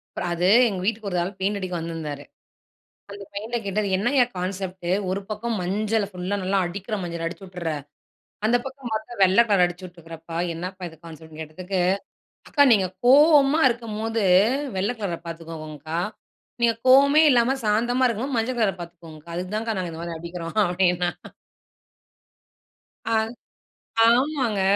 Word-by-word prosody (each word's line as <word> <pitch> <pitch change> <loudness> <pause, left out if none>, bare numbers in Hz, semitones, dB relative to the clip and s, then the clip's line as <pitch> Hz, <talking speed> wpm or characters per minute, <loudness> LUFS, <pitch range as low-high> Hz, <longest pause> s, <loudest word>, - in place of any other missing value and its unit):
அப்றம் 175 - -2
அது 175 +1 +1 0.2
எங்க 190 - -4
வீட்டுக்கு 220 -1 -1
ஒரு 180 - -2
ஆள் 180 - -2
பெயிண்ட் 200 +2 0
அடிக்க 185 -2 -5
வந்திருந்தாரு. 160 -4 -5 0.9
அந்த 200 0 -8
பையன்கிட்ட 220 +4 -3
கேட்டேன், 200 +1 -1
இது 190 - +1
என்னங்க 245 +6 +3 0.2
கான்செப்ட்டு? 185 -1 -4 0.2
ஒரு 195 +1 -2
பக்கம் 220 +2 -3
மஞ்சள 210 +4 0
ஃபுல்லா 185 +1 -3
நல்லா 195 +2 +1
அடிக்கிற 195 +5 -4
மஞ்சள 170 -1 -4
அடிச்சி 175 +4 -8
விட்டுர்ற, 180 -3 -4 0.8
அந்த 235 +2 +4
பக்கம் 265 -2 -7
பார்த்தா 220 +2 -4
வெள்ளை 190 +5 +6
கலர் 200 -4 +5
அடிச்சி 175 +1 -8
விட்டுருக்கறப்பா, 165 -1 -10 0.2
என்னப்பா 180 +2 -6
இது 160 - -16
கான்செப்ட் 160 -1 -12
னு 155 - -9
கேட்டதுக்கு, 180 +4 -4 0.7
அக்கா 285 - +5
நீங்க 195 -4 +4 0.2
கோவமா 290 +2 +6
இருக்கும்போது 225 -1 -2 0.5
வெள்ள 195 +4 0
கலர 180 -5 -2
பார்த்துக்கோங்கங்க்கா. 160 -1 -6 0.6
நீங்க 230 -1 +4
கோவமே 280 +4 +7
இல்லாம 245 0 +3
சாந்தமா 240 +5 +2
இருக்கும்போது 245 +4 -2
மஞ்ச 235 +3 0
கலர 215 -4 +2
பார்த்துக்கோங்க்கா. 170 -2 -11
அதுக்கு 180 +3 -4
தான்க்கா 225 0 -2
நாங்க 180 -2 -3
இந்த 160 +1 -7
மாதிரி 170 -1 -5
அடிக்கிறோம் 170 +2 -7
அப்படின்னான். 180 -1 +1 1.9
ஆ. - - +2 0.9
ஆமாங்க 245 -4 +2
190 Hz, 145 wpm, -24 LUFS, 175-225 Hz, 1.9 s, கோவமே